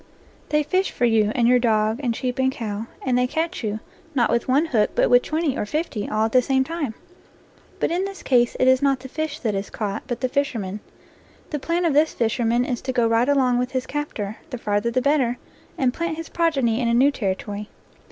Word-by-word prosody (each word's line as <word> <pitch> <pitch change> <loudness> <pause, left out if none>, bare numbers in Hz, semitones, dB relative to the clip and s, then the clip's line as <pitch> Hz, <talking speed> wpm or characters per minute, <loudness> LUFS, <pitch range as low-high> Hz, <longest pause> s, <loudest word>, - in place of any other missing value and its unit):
They 300 0 +2
fish 370 +5 +1
for 245 - 0
you 220 -2 +3
and 235 -2 +3
your 250 0 +5
dog 220 -1 +1
and 240 -4 -1
sheep 250 +2 -3
and 260 0 +3
cow, 220 -3 -5 0.2
and 255 -2 +1
they 250 0 +2
catch 320 +2 -2
you, 215 0 -2 0.4
not 240 -4 +2
with 235 0 0
one 275 +5 +3
hook, 230 -10 +2
but - - +2
with 245 0 +7
twenty 310 -2 -1
or 210 - -3
fifty, 270 -7 -2
all 215 +1 +1
at 225 - -2
the 255 - +5
same 265 +1 +2
time. 290 -6 -4 0.8
But - - 0
in 355 +2 0
this 395 0 -7
case 240 -2 +2
it 255 - +3
is 260 0 +5
not 275 -2 +2
the 265 - -8
fish 310 +2 -3
that 220 -4 0
is 195 0 -3
caught, 210 -1 -3
but 240 - -4
the 255 - +2
fisherman. 245 -8 -2 0.7
The 295 - -2
plan 340 +5 0
of 325 - +2
this 305 +2 +3
fisherman 235 +1 +1
is 250 -3 -3
to 260 - -3
go 240 -2 +2
right 230 +3 +2
along 255 -3 +3
with 250 +1 -2
his 260 0 -1
captor, 230 -8 -4
the 255 - -5
farther 205 0 0
the 255 +2 0
better, 270 -4 +2 0.4
and 255 -2 +1
plant 335 0 -3
his 330 - -6
progeny 270 -9 +1
in 240 - +1
a 235 - +2
new 270 +4 +5
territory. 205 -2 -3
250 Hz, 230 wpm, -23 LUFS, 225-285 Hz, 0.8 s, with